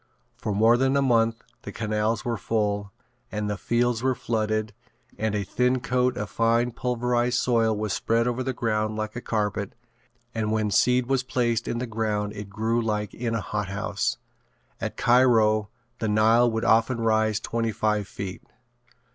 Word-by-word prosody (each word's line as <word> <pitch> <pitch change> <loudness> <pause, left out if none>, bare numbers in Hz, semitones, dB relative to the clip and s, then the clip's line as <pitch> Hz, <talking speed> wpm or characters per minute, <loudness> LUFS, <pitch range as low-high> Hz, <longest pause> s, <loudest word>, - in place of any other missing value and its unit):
For - - -4
more 115 +3 +5
than 135 +2 +2
a - - +3
month 115 -3 +2 0.2
the - - -7
canals 110 0 -1
were 120 -1 0
full, 105 -2 -1 0.4
and 105 0 -2
the 105 - -1
fields 120 +4 0
were 130 0 +1
flooded 110 -2 -1 0.4
and 110 -1 -1
a 105 - 0
thin 125 +6 +1
coat 125 0 0
of 105 - -3
fine 115 +1 +2
pulverized 125 0 0
soil 115 -3 +2
was 105 -2 -2
spread 115 +1 +1
over 125 +1 -1
the 130 +1 -1
ground 110 -3 -1
like 110 +1 -4
a 120 - -4
carpet 105 -3 -2 0.6
and 110 -1 -1
when 110 -1 0
seed 125 +5 +3
was 135 0 +1
placed 120 -2 -1
in 120 - -2
the 125 - -2
ground 105 -2 -2
it 105 -1 -7
grew 110 +4 0
like 105 -3 -2
in 115 -1 -2
a 110 - -1
hothouse. 105 +5 -2 0.6
At - - -4
Cairo 115 -4 +4 0.3
the 110 - -1
Nile 110 +3 +4
would 110 +1 -2
often 115 +2 +3
rise 110 -2 +2
twenty 115 0 -2
five 105 -2 0
feet. 95 -2 -6
115 Hz, 170 wpm, -25 LUFS, 105-120 Hz, 0.6 s, more